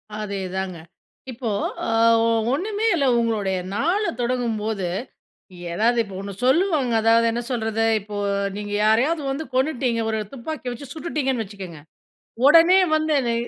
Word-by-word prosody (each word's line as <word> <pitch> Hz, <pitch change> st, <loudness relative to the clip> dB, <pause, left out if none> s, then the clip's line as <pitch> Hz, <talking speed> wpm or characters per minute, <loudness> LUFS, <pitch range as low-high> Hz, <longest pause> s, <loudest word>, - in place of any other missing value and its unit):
அதேதாங்க, 190 Hz, -3 st, -4 dB, 0.5 s
இப்போ, 230 Hz, -1 st, -4 dB, 0.4 s
அ -, -, -3 dB, 0.7 s
ஒண்ணுமே 415 Hz, +7 st, -2 dB
இல்ல. 280 Hz, -4 st, +1 dB
உங்களுடைய 210 Hz, -5 st, 0 dB, 0.2 s
நாள 345 Hz, -, +1 dB, 0.2 s
தொடங்கும்போது 220 Hz, -5 st, -1 dB, 0.9 s
ஏதாவது, 235 Hz, +6 st, +2 dB
இப்போ 195 Hz, -2 st, -11 dB
ஒண்ணு 200 Hz, 0 st, -6 dB
சொல்லுவாங்க. 290 Hz, -3 st, +2 dB
அதாவது 230 Hz, +1 st, +4 dB
என்ன 240 Hz, +1 st, -2 dB
சொல்றது? 225 Hz, -2 st, -1 dB, 0.2 s
இப்போ, 205 Hz, +1 st, -8 dB, 0.4 s
நீங்க 205 Hz, 0 st, -5 dB
யாரையாவது 265 Hz, +9 st, +2 dB
வந்து 300 Hz, +4 st, -3 dB
கொன்னுட்டீங்க. 255 Hz, -4 st, 0 dB
ஒரு 220 Hz, -, -1 dB
துப்பாக்கிய 260 Hz, -1 st, -5 dB
வச்சு 275 Hz, +2 st, -10 dB
சுட்டுட்டீங்கன்னு 275 Hz, -8 st, -2 dB
வச்சுக்கங்க. 190 Hz, -6 st, -9 dB, 0.7 s
உடனே 335 Hz, +5 st, +7 dB, 0.2 s
வந்து 310 Hz, 0 st, +1 dB
என்ன 235 Hz, -2 st, 0 dB
235 Hz, 125 wpm, -22 LUFS, 215-290 Hz, 0.9 s, உடனே